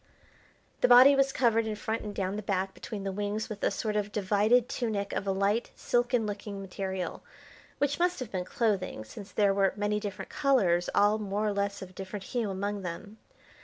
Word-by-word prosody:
The -, -, +4 dB
body 255 Hz, +3 st, +9 dB
was 275 Hz, 0 st, +3 dB
covered 230 Hz, -4 st, +2 dB
in 215 Hz, -, -2 dB
front 220 Hz, +2 st, -3 dB
and 210 Hz, -1 st, -6 dB
down 190 Hz, 0 st, -2 dB
the 210 Hz, -, -3 dB
back 195 Hz, -2 st, -1 dB
between 205 Hz, -3 st, -7 dB
the 195 Hz, -, -2 dB
wings 205 Hz, +2 st, -3 dB
with 210 Hz, -2 st, -7 dB
a -, -, +4 dB
sort 210 Hz, +2 st, -2 dB
of 210 Hz, -1 st, -1 dB
divided 210 Hz, +4 st, +3 dB
tunic 220 Hz, -6 st, -2 dB
of 200 Hz, -, -3 dB
a -, -, +2 dB
light, 200 Hz, +4 st, +1 dB
silken 240 Hz, -1 st, +1 dB
looking 205 Hz, -1 st, -5 dB
material, 190 Hz, -1 st, -4 dB, 0.6 s
which 285 Hz, +1 st, 0 dB
must 355 Hz, -2 st, +1 dB
have 255 Hz, -4 st, -6 dB
been 185 Hz, -2 st, -2 dB
clothing, 195 Hz, -, -1 dB
since 195 Hz, -, -10 dB
there 200 Hz, -2 st, +3 dB
were 195 Hz, -1 st, +2 dB
many 210 Hz, 0 st, 0 dB
different 205 Hz, -2 st, -6 dB
colours 190 Hz, -12 st, +2 dB
all 210 Hz, +1 st, +4 dB
more 205 Hz, 0 st, -2 dB
or 210 Hz, -, +1 dB
less 200 Hz, 0 st, -2 dB
of 185 Hz, 0 st, -11 dB
different 195 Hz, +1 st, -6 dB
hue 235 Hz, -1 st, -2 dB
among 200 Hz, +1 st, -3 dB
them. 190 Hz, +4 st, -7 dB
205 Hz, 200 wpm, -29 LUFS, 195-225 Hz, 0.6 s, body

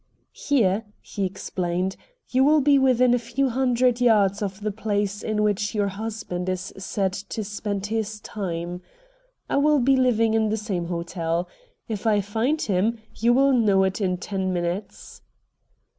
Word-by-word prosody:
"Here," 225 Hz, -6 st, +1 dB
he 200 Hz, -, -4 dB
explained, 185 Hz, -1 st, -3 dB, 0.4 s
"you 260 Hz, +1 st, +4 dB
will 305 Hz, +2 st, +5 dB
be 280 Hz, 0 st, +4 dB
within 255 Hz, -2 st, +4 dB
a 245 Hz, -, +3 dB
few 240 Hz, +4 st, -1 dB
hundred 250 Hz, -1 st, +2 dB
yards 210 Hz, -4 st, +3 dB
of 195 Hz, 0 st, -4 dB
the 210 Hz, 0 st, -1 dB
place 205 Hz, -1 st, -2 dB
in 215 Hz, -1 st, -1 dB
which 210 Hz, +1 st, 0 dB
your 205 Hz, -1 st, +1 dB
husband 200 Hz, -3 st, -4 dB
is 185 Hz, 0 st, -4 dB
said 190 Hz, 0 st, -2 dB
to 205 Hz, +3 st, -5 dB
spend 205 Hz, -1 st, -4 dB
his 215 Hz, 0 st, -3 dB
time. 175 Hz, -4 st, -5 dB, 0.7 s
I -, -, 0 dB
will 300 Hz, +1 st, +4 dB
be 270 Hz, +1 st, +4 dB
living 230 Hz, -4 st, +3 dB
in 220 Hz, -1 st, +2 dB
the 220 Hz, -, 0 dB
same 200 Hz, -5 st, -3 dB
hotel. 170 Hz, 0 st, -2 dB, 0.4 s
If 220 Hz, -1 st, -3 dB
I 210 Hz, -2 st, +4 dB
find 225 Hz, +10 st, 0 dB
him 210 Hz, +4 st, +1 dB, 0.2 s
you 235 Hz, +1 st, +2 dB
will 270 Hz, +2 st, +4 dB
know 205 Hz, -6 st, +4 dB
it 190 Hz, +2 st, -1 dB
in 180 Hz, -2 st, 0 dB
ten 190 Hz, 0 st, -3 dB
minutes." 175 Hz, +3 st, -4 dB
210 Hz, 160 wpm, -24 LUFS, 190-235 Hz, 0.7 s, will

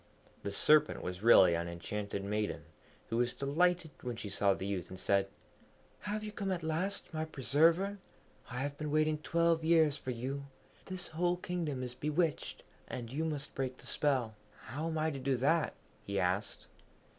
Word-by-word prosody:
The -, -, -3 dB
Serpent 150 Hz, +8 st, +4 dB
was 90 Hz, +1 st, -4 dB
really 95 Hz, -6 st, +7 dB
an 85 Hz, +1 st, -1 dB
enchanted 100 Hz, +4 st, -4 dB
maiden, 105 Hz, +1 st, -2 dB, 0.5 s
who 115 Hz, -, 0 dB
was 120 Hz, 0 st, +1 dB
delighted 165 Hz, +4 st, +1 dB
when 125 Hz, -1 st, -4 dB
she 110 Hz, -2 st, -6 dB
saw 100 Hz, 0 st, +2 dB
the 95 Hz, -, -5 dB
youth, 95 Hz, -3 st, -3 dB
and 95 Hz, -, -8 dB
said, 100 Hz, 0 st, +2 dB, 0.7 s
'Have 215 Hz, +1 st, -3 dB
you 210 Hz, -, -5 dB
come 195 Hz, -2 st, -3 dB
at 175 Hz, -3 st, -2 dB
last, 165 Hz, +5 st, -2 dB
my 155 Hz, 0 st, -1 dB
preserver? 165 Hz, +7 st, +2 dB, 0.5 s
I 125 Hz, -, -5 dB
have 145 Hz, +1 st, -2 dB
been 150 Hz, -1 st, -2 dB
waiting 155 Hz, 0 st, +2 dB
twelve 165 Hz, +1 st, +2 dB
years 160 Hz, -3 st, +4 dB
for 130 Hz, -, -7 dB
you. 135 Hz, +3 st, -3 dB, 0.4 s
This 185 Hz, -1 st, -5 dB
whole 175 Hz, +2 st, +1 dB
kingdom 165 Hz, -7 st, -3 dB
is 125 Hz, -1 st, -5 dB
bewitched, 150 Hz, +3 st, -1 dB, 0.2 s
and 120 Hz, 0 st, -6 dB
you 155 Hz, +3 st, -1 dB
must 150 Hz, -3 st, -3 dB
break 130 Hz, -1 st, -3 dB
the -, -, -13 dB
spell.' 130 Hz, -7 st, +1 dB, 0.3 s
'How 150 Hz, +7 st, -4 dB
am 160 Hz, -1 st, -2 dB
I 155 Hz, 0 st, +1 dB
to 140 Hz, -, -5 dB
do 130 Hz, 0 st, +1 dB
that?' 150 Hz, +5 st, +2 dB, 0.3 s
he 100 Hz, 0 st, -2 dB
asked. 95 Hz, +3 st, -1 dB
145 Hz, 180 wpm, -33 LUFS, 115-160 Hz, 0.7 s, really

